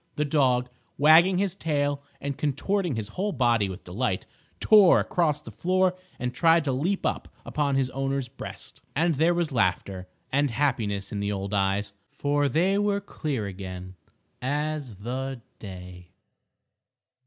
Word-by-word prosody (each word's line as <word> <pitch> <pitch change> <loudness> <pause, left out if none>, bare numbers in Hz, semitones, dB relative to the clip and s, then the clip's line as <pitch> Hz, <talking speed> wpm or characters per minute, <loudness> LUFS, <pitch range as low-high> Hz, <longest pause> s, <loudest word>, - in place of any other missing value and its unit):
The 150 - 0
dog, 130 -4 +2 0.3
wagging 160 +6 +6
his 195 -1 +1
tail 145 -5 -1 0.2
and 140 -1 -3
contorting 165 +4 -1
his 110 -1 -4
whole 195 - -2
body 120 - +2
with 95 - -8
delight, 95 +1 -2 0.3
tore 210 -5 +7
across 150 -4 0
the - - -10
floor 185 +1 +1 0.2
and 125 0 -3
tried 165 +4 +4
to 140 - 0
leap 170 +10 -1
up - - -1 0.2
upon 145 -2 0
his 130 -1 +1
owner's 135 -1 -2
breast. 135 +3 -9
And 165 +3 +2
there 165 +4 +3
was 170 -3 0
laughter 95 -4 0 0.2
and 145 +1 +2
happiness 115 -6 -1
in 105 - -3
the 100 0 -1
old 100 0 -4
eyes; 100 0 0 0.2
for 145 0 0
they 185 +8 +2
were 205 -1 +1
clear 150 - -3
again 95 -1 -7 0.5
as 145 -2 -2
the 125 +4 -5 0.2
day. 90 -3 -10
135 Hz, 150 wpm, -26 LUFS, 105-160 Hz, 0.5 s, tore